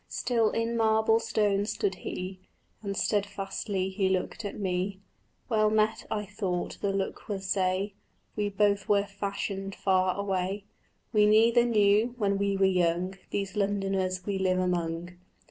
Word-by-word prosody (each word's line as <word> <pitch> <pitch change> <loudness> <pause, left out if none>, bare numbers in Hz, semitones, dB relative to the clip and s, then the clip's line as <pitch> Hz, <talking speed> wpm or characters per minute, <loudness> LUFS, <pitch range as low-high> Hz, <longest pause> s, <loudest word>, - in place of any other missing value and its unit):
Still 230 -3 +1
in 230 +1 -1
marble 220 0 +3
stone 210 -3 +1
stood 205 -2 -1
he, 185 +1 -5 0.4
And 200 -2 -4
stedfastly 200 -1 -1
he 190 -1 +1
looked 190 +4 -2
at 205 - -5
me. 190 0 -1 0.5
"Well 215 -3 +3
met," 220 +1 +1
I 210 -1 -2
thought 190 -3 -3
the 200 - +1
look 195 0 -3
would 195 -2 -3
say, 190 +1 0 0.4
"We 210 -1 0
both 200 0 +1
were 200 -1 +4
fashioned 195 -1 -4
far 185 -1 +2
away; 195 0 -1 0.5
We 210 -1 +5
neither 230 +3 +5
knew, 215 +1 +3
when 200 -3 +1
we 200 -1 +1
were 195 - +4
young, 180 0 +1 0.2
These 195 -1 -3
Londoners 195 -2 0
we 200 -2 -1
live 185 -1 +2
among." 175 -1 -2
200 Hz, 145 wpm, -28 LUFS, 190-210 Hz, 0.5 s, We